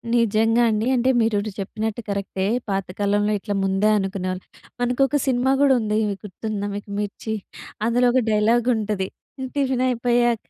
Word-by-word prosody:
నిజంగా 225 0 +3
అండి. 215 +1 0
అంటే, 250 +2 +2
మీరిపుడు 215 -2 +1
చెప్పినట్టు 220 +3 -3
కరెక్టే. 195 -1 -2 0.2
పాతకాలంలో 200 +2 0
ఇట్ల 205 +1 -4
ముందే 195 +2 +2
అనుకునేవాళ్ 190 -2 -2 0.4
మనకొక 250 +3 +2
సినిమా 255 +1 +2
గూడా 280 -2 +5
ఉంది. 215 0 0 0.3
గుర్తుందా 205 +1 -4
మీకు? 205 0 -7
'మిర్చి.' 210 +2 -4 0.5
అందులో 245 +2 +3
ఒక 255 +1 +3
డైలాగుంటది. 215 -2 +1 0.3
హ్మ్, 260 -1 -4
టిఫినయిపోయాక, 245 -3 +1
220 Hz, 125 wpm, -23 LUFS, 205-240 Hz, 0.5 s, గూడా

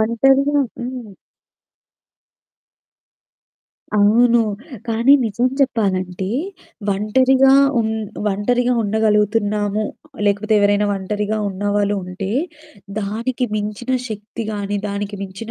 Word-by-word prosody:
ఒంటరిగా 270 +6 +3 0.2
హ్మ్. 245 -2 -6 2.9
అవును. 230 +3 +5 0.5
కానీ 230 +4 +4
నిజం 225 +3 0
చెప్పాలంటే 190 -8 0 0.7
ఒంటరిగా 260 +6 +3 0.3
ఉం 220 - 0 0.4
ఒంటరిగా 245 +5 +1
ఉండగలుగుతున్నాము. 210 0 +1 0.4
లేకపోతే 205 +2 +1
ఎవరైనా 205 0 +3
ఒంటరిగా 210 +2 -2
ఉన్నవాళ్ళు 205 +1 0
ఉంటే 180 +2 -5 0.7
దానికి 230 +5 -2
మించిన 215 +4 -3 0.2
శక్తి 215 +2 -6
గాని, 205 0 -2
దానికి 200 0 -4
మించిన 195 +4 -7
210 Hz, 80 wpm, -19 LUFS, 205-235 Hz, 2.9 s, అవును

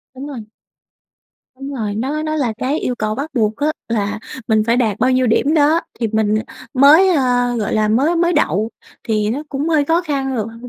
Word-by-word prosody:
Đúng 275 +3 -7
rồi. 280 -4 -7 1.2
Đúng 275 +1 -6
rồi, 215 -5 -3
nó 270 +8 -2
nó 310 0 -2
là 250 -7 0
cái 280 +5 -1
yêu 250 - -2
cầu 215 0 -1
bắt 285 +5 -4
buộc 215 -2 +1
á 290 - -1 0.2
là 210 -2 -1 0.3
mình 220 -1 +3
phải 235 +1 +2
đạt 220 -5 0
bao 255 - +2
nhiêu 255 0 +2
điểm 275 +6 +2
đó 310 +2 +3 0.2
thì 230 - +1
mình 215 -1 +1 0.4
mới, 300 +8 +6
a, 245 -6 +1
gọi 210 -3 -2
là, 215 0 +2
mới 275 +10 +2
mới 345 +1 +2
đậu 225 - +1 0.3
thì 215 -1 0
nó 280 +6 -3
cũng 285 +3 -2
hơi 305 -3 +2
khó 330 +4 +1
khăn 270 -4 -2
lượt 215 -1 -2 0.2
được 245 - -8
255 Hz, 215 wpm, -18 LUFS, 220-295 Hz, 1.2 s, mới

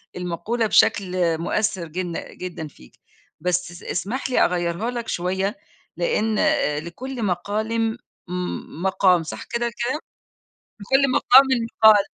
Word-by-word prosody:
المقولة 195 +6 -2
بشكل 180 -5 +3
مؤثر 180 0 -1
جن 175 +1 -4 0.2
جدًا 175 -4 -6
فيك 65 - -18 0.4
بس 180 +1 -1
اس 175 - -12
اسمح 260 +6 -3
لي 250 - +2
أغيرها 175 +6 -1
لك 235 -2 -5
شوية 190 +6 -1 0.4
لأن 225 - 0
آآ 150 0 +2
لكل 235 +9 -6
مقالم 220 +5 -1 0.3
م 180 -2 -5
مقام، 185 -3 +3
صح 155 - -7
كده 235 0 -2 0.2
كلام؟ 300 +4 -1 0.8
لكل 270 +5 +2
مقامٍ 265 +2 +7 0.4
مقال. 210 -2 +8
190 Hz, 125 wpm, -23 LUFS, 175-230 Hz, 0.8 s, مقال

